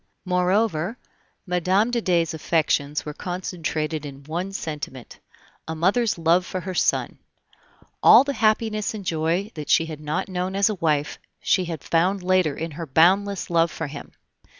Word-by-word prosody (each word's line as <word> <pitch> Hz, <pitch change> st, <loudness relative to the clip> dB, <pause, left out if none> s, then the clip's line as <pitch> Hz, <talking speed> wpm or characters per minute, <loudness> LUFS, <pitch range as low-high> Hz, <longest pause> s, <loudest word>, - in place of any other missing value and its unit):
Moreover, 180 Hz, +2 st, +1 dB, 0.5 s
Mme. 185 Hz, +5 st, +1 dB
de 240 Hz, -1 st, 0 dB
Dey's 170 Hz, -5 st, +1 dB
affections 150 Hz, -2 st, 0 dB
were 150 Hz, -, -5 dB
concentrated 165 Hz, -3 st, -3 dB
in 140 Hz, -1 st, -9 dB
one 170 Hz, +6 st, -4 dB
sentiment 150 Hz, -8 st, -6 dB, 0.5 s
a 160 Hz, -, -4 dB
mother's 205 Hz, +7 st, +1 dB
love 170 Hz, +2 st, +3 dB
for 185 Hz, 0 st, -5 dB
her 185 Hz, +1 st, -5 dB
son. -, -, 0 dB, 0.8 s
All -, -, +8 dB
the 280 Hz, 0 st, -2 dB
happiness 215 Hz, -2 st, +1 dB
and 200 Hz, -3 st, -7 dB
joy 170 Hz, +5 st, -1 dB
that 150 Hz, -2 st, -7 dB
she 165 Hz, -, +4 dB
had 155 Hz, -2 st, -7 dB
not 155 Hz, +5 st, -3 dB
known 185 Hz, 0 st, -3 dB
as 200 Hz, +2 st, +3 dB
a -, -, 0 dB
wife, 150 Hz, -2 st, 0 dB, 0.2 s
she 185 Hz, -, +1 dB
had 165 Hz, -4 st, -6 dB
found 180 Hz, +3 st, +1 dB
later 185 Hz, -5 st, +2 dB
in 165 Hz, +1 st, -4 dB
her 165 Hz, +2 st, -7 dB
boundless 190 Hz, +7 st, +2 dB
love 165 Hz, 0 st, +3 dB
for 160 Hz, -, -5 dB
him. 145 Hz, 0 st, -9 dB
175 Hz, 160 wpm, -23 LUFS, 155-190 Hz, 0.8 s, All